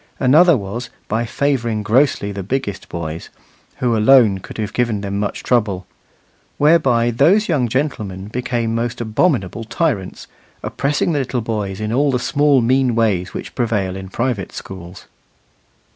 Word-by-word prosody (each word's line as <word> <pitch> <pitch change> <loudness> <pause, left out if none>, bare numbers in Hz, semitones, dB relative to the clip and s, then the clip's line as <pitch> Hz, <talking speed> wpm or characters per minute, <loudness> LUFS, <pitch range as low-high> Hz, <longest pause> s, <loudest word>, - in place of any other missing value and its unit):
Another 155 +5 +5
was, 115 +4 -5 0.2
by 115 +2 -1
favouring 120 -5 -1
grossly 110 -2 +2
the 100 0 -5
biggest 100 0 -4
boys, 80 -1 -5 0.5
who 120 -2 0
alone 110 -3 +5
could - - -10
have 105 -2 -3
given 115 -4 0
them 100 0 -3
much 105 - -3
trouble; 105 -7 0 0.7
whereby 130 -7 +3
those 175 - +3
young 145 -8 +1
gentlemen 105 -8 -2
became 120 0 -2
most 120 +2 -2
abominable 115 - 0
tyrants, 115 - -2 0.4
oppressing 145 +4 0
the 150 - 0
little 130 -2 -2
boys 105 -4 -3
in 110 +1 -2
all 140 +3 +2
the 130 - +1
small 145 +1 +2
mean 130 0 +2
ways 100 -6 0
which - - -6
prevail 105 -6 -1
in 95 -1 -7
private 115 -3 -2
schools. 95 -1 -9
115 Hz, 145 wpm, -19 LUFS, 100-130 Hz, 0.7 s, Another